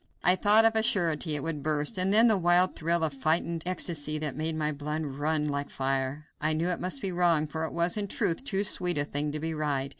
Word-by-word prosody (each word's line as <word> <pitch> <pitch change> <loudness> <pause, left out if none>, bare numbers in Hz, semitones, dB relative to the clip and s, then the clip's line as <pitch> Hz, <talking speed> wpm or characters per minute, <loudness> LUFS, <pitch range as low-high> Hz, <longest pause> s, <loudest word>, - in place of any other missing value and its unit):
I 180 - +5
thought, 210 +4 +5
of 225 0 +3
a 220 - +3
surety, 165 -7 +1
it 145 - -2
would 160 -3 -3
burst; 150 0 -2
and 185 +1 0
then 220 +3 +6
the 225 -2 +5
wild 180 0 +3
thrill 170 +1 +1
of 155 -3 0
frightened 160 +4 -1
ecstasy 160 -4 -1
that 150 -3 -4
made 155 +2 -2
my 155 -1 -1
blood 150 +2 -4
run 150 +2 -2
like 140 -1 -3
fire! 135 +2 -3 0.2
I 155 +1 +1
knew 165 +3 -1
it 180 - -2
must 185 +10 -3
be 195 - -2
wrong, 170 -3 +2
for 160 +1 -4
it - - -6
was, 170 +3 0
in 205 -1 -2
truth, 170 +1 -1
too 200 -7 -1
sweet 180 -4 +1
a 145 - 0
thing 145 +1 -3
to 155 - -5
be 160 +1 -3
right. 145 -3 -2
160 Hz, 245 wpm, -28 LUFS, 150-180 Hz, 0.2 s, then